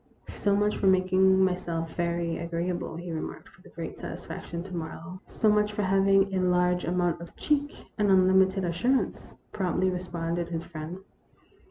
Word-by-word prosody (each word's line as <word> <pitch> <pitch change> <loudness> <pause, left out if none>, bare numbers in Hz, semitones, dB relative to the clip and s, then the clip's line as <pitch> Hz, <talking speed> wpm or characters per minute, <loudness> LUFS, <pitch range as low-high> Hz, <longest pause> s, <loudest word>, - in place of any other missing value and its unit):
So 200 -1 +1
much 210 +1 +1
for 195 - +1
making 190 0 +4
myself 170 -3 -2
very 170 -1 -1
agreeable," 170 0 -3
he 175 +1 -6
remarked, 160 - -6
with - - -18
great - - -6
satisfaction, 170 0 -6
to 185 -1 -7
Marlowe. 170 +2 -6
" - - -37
So 220 - 0
much 210 0 +3
for 210 - -1
having 195 0 +3
a 190 - +1
large 180 0 +2
amount 175 0 0
of 170 - -10
cheek 290 -1 -1
and 205 -1 +3
unlimited 190 0 +4
assurance," 240 +10 0 0.2
promptly 185 -1 0
responded 175 -1 -3
his 165 -1 -3
friend. 160 +1 -7
180 Hz, 160 wpm, -28 LUFS, 170-190 Hz, 0.2 s, making